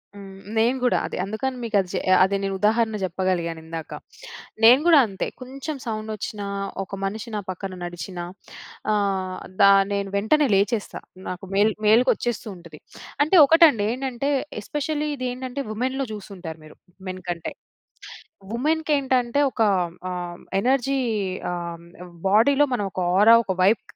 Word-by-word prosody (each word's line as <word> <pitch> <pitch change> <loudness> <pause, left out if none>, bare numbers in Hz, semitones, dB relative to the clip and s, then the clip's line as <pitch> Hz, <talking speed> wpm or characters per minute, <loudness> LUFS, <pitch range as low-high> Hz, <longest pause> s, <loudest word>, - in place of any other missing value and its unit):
హ్మ్. 195 -1 -11 0.2
నేను 235 +4 +3
గూడా 250 - +3
అదే - - -5
అందుకని 255 +6 -3
మీకది 200 -5 0
చె 185 - 0 0.2
అది 195 +1 +1
నేను 195 0 -1
ఉదాహరణ 220 +1 +2
జెప్పగలిగానిందాక. 170 -3 -3 0.8
నేను 240 +4 +8
గూడా 325 -4 +8
అంతే 195 -2 -4
కొంచెం 275 +4 -6
సౌండొచ్చినా 215 -2 -4 0.4
ఒక 195 - -7
మనిషి 215 +4 -4
నా - - -1
పక్కన 185 +1 -5
నడిచినా 175 +1 -6 0.7
ఆహ్, 195 -3 -1 0.2
దా 200 0 +8 0.2
నేను 200 -1 -2
వెంటనే 280 +9 +3
లేచేస్తా. 205 +2 0 0.3
నాకు 180 +1 -6
మేల్ 210 +2 +4
మేల్కొచ్చేస్తూ 240 +1 +2
ఉంటది. 170 -3 -13 0.4
అంటే 310 +6 +2
ఒకటండి 305 - +5
ఏంటంటే 260 +1 -3 0.3
ఎస్పెషల్లీ 295 +5 -2
ఇది 255 -2 -3
ఏంటంటే 255 +2 -5
వుమెన్‌లో 260 +5 -2
జూసుంటారు 185 -6 -8
మీరు 155 - -15 0.3
మెన్ 185 0 -5
కంటే. 170 -2 -4 1.0
వుమెన్‌కేంటంటే 275 -2 +1
ఒక 230 - -4 0.5
ఆహ్, 175 -1 -5 0.2
ఎనర్జీ 270 +3 +1 0.5
ఆహ్, 170 -1 -6 0.2
ఆహ్, 180 -1 -13 0.2
బాడీ‌లో 275 +8 +4
మనం 205 - -2
ఒక - - -4 0.2
ఔరా 220 +3 +8
ఒక 190 - -1
వైబ్ 205 +4 +4
215 Hz, 135 wpm, -23 LUFS, 190-255 Hz, 1.0 s, నేను